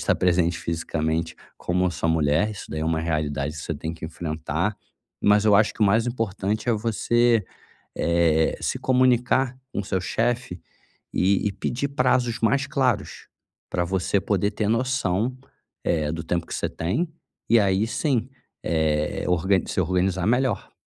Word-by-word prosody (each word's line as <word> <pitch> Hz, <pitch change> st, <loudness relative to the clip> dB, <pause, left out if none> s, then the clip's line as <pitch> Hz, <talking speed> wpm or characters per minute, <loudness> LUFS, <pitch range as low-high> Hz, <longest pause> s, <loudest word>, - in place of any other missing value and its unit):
estar -, -, +2 dB
presente 85 Hz, -1 st, +2 dB
fisicamente, 80 Hz, 0 st, -2 dB, 0.2 s
como 90 Hz, +1 st, 0 dB
a -, -, +1 dB
sua 85 Hz, -1 st, -2 dB
mulher, 80 Hz, +5 st, +2 dB
isso 105 Hz, -, -8 dB
daí 80 Hz, -, -3 dB
é 80 Hz, -, -1 dB
uma 80 Hz, 0 st, +1 dB
realidade 75 Hz, -2 st, -2 dB
que 75 Hz, -, -6 dB
você 80 Hz, -, -3 dB
tem 80 Hz, +3 st, -5 dB
que 80 Hz, -, -9 dB
enfrentar. 80 Hz, 0 st, -3 dB, 0.5 s
Mas 105 Hz, 0 st, +4 dB
eu 105 Hz, -1 st, +5 dB
acho 105 Hz, +1 st, +3 dB
que -, -, -18 dB
o -, -, +7 dB
mais 110 Hz, +4 st, +3 dB
importante 110 Hz, -1 st, -2 dB
é 120 Hz, -, +4 dB
você, 115 Hz, +1 st, +2 dB, 0.5 s
eh, 85 Hz, -2 st, +2 dB
se -, -, -1 dB
comunicar 130 Hz, 0 st, +2 dB, 0.2 s
com -, -, -1 dB
seu 95 Hz, 0 st, -1 dB
chefe 115 Hz, -2 st, -1 dB, 0.5 s
e 100 Hz, +2 st, +2 dB
e -, -, -1 dB
pedir 120 Hz, +7 st, -2 dB
prazos 125 Hz, -3 st, +1 dB
mais 135 Hz, +4 st, +2 dB
claros 130 Hz, -8 st, -1 dB, 0.4 s
pra 90 Hz, -, +1 dB
você 95 Hz, +2 st, 0 dB
poder 100 Hz, 0 st, 0 dB
ter 105 Hz, 0 st, -2 dB
noção, 120 Hz, -1 st, 0 dB, 0.5 s
eh, 75 Hz, -3 st, 0 dB
do 80 Hz, 0 st, -4 dB
tempo 85 Hz, -1 st, -1 dB
que -, -, -6 dB
você -, -, -2 dB
tem 150 Hz, -, -2 dB, 0.4 s
e 115 Hz, 0 st, +6 dB
aí 100 Hz, +2 st, +2 dB
sim, 130 Hz, -2 st, 0 dB, 0.3 s
eh, 80 Hz, -2 st, 0 dB
org 90 Hz, +2 st, +2 dB
se -, -, 0 dB
organizar 95 Hz, +1 st, 0 dB
melhor. 125 Hz, -2 st, 0 dB
95 Hz, 165 wpm, -24 LUFS, 85-115 Hz, 0.5 s, o